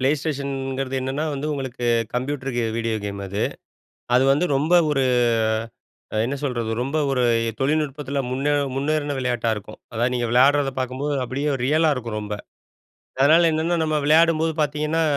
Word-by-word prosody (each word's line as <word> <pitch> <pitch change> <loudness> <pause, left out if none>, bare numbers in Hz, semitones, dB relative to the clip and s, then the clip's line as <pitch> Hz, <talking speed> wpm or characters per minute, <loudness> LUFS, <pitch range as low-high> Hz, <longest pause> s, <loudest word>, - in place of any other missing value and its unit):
Play 130 +2 +3
Stationகிறது 135 -3 -3
என்னன்னா 135 +4 -2
வந்து 140 +2 -3
உங்களுக்கு 130 -3 -5 0.3
கம்ப்யூட்டர் 130 +2 -2 0.3
வீடியோ 115 -1 -1
கேம் 100 0 -4
அது. 100 +2 -3 0.7
அது 125 - +5
வந்து 150 +6 +2
ரொம்ப 150 +5 0 0.2
ஒரு 135 -2 +2 1.2
என்ன 140 +4 -2
சொல்றது. 120 -5 -2
ரொம்ப 140 +5 -2
ஒரு 130 -2 +1 0.4
தொழில்நுட்பத்துல 145 -1 -1
முன்னே 135 +3 0 0.2
முன்னேறின 145 +1 -1
விளையாட்டா 120 -3 0
இருக்கும். 105 +1 -9
அதாவது 120 +3 0
நீங்க 120 -1 0
விளையாடுறத 135 +3 +4
பார்க்கும்போது 130 +3 -2
அப்படியே 140 +4 -2
ரியலா 155 +4 +3
இருக்கும் 115 -4 -5
ரொம்ப. 105 0 -4 0.9
அதனால 160 +5 +6
என்னென்ன 165 +2 0
நம்ம 155 -1 0
விளையாடும்போது 160 +1 +4
பார்த்தீங்கன்னா, 150 +2 0
135 Hz, 140 wpm, -23 LUFS, 125-150 Hz, 1.2 s, அதனால